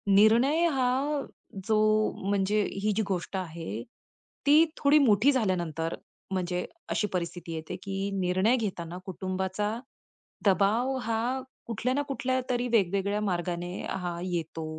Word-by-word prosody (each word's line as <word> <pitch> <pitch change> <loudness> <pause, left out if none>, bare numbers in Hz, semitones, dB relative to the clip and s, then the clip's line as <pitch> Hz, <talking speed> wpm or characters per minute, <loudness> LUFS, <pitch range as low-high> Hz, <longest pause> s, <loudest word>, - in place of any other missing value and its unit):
निर्णय 245 +11 +5
हा 270 +3 +1 0.5
जो 215 -1 +3 0.5
म्हणजे 205 +1 +2 0.2
ही 215 - +3
जी - - +3
गोष्ट 190 0 -3
आहे 165 - -5 0.6
ती 305 +3 +8
थोडी 295 +1 +5
मोठी 220 +6 +5
झाल्यानंतर 175 - -1 0.4
म्हणजे 180 -1 -1 0.2
अशी 210 - +1
परिस्थिती 170 -1 -3
येते 160 +3 -5
की 195 0 -2
निर्णय 185 +6 +3
घेताना 180 -5 -4
कुटुंबाचा 190 +3 -2 0.7
दबाव 215 +7 +3
हा 230 +4 -1 0.3
कुठल्या 235 +3 -1
ना 290 - +2
कुठल्यातरी 255 -2 -1
वेगवेगळ्या 200 -1 +2
मार्गाने 175 -2 -2 0.2
हा 175 -2 -3
येतो. 165 -3 -3
200 Hz, 120 wpm, -28 LUFS, 180-240 Hz, 0.7 s, ती